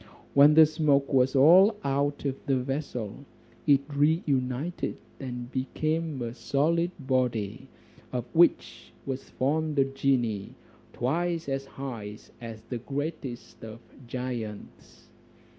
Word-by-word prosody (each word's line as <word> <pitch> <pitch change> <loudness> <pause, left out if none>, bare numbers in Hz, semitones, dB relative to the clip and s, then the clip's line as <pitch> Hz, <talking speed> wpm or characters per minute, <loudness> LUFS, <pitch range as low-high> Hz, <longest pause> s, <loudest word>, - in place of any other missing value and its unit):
When 145 +2 +7
the 160 0 +9
smoke 150 -3 +1
was 130 +1 +3
all 180 +10 +7
out 140 +1 -1
of 135 -1 0
the 135 -1 +2
vessel, 130 -3 -4 0.4
it 140 -2 +6
re 155 +5 +3
united 135 +4 -1 0.2
and 125 -2 -6
became 155 +3 -2
a 115 -1 -4
solid 155 +8 +1
body, 130 -3 -1 0.4
of 125 -2 -3
which 170 +1 +2
was 135 -1 -5
formed 150 +3 -1
a 135 - +5
genie 130 -7 -1 0.4
twice 165 +6 -1
as 135 0 -2
high 115 -7 -7 0.2
as 115 -2 -8
the 120 +1 -5
greatest 140 -2 -5
of 110 0 -8 0.3
giants. 120 -4 -7
135 Hz, 120 wpm, -28 LUFS, 125-150 Hz, 0.4 s, the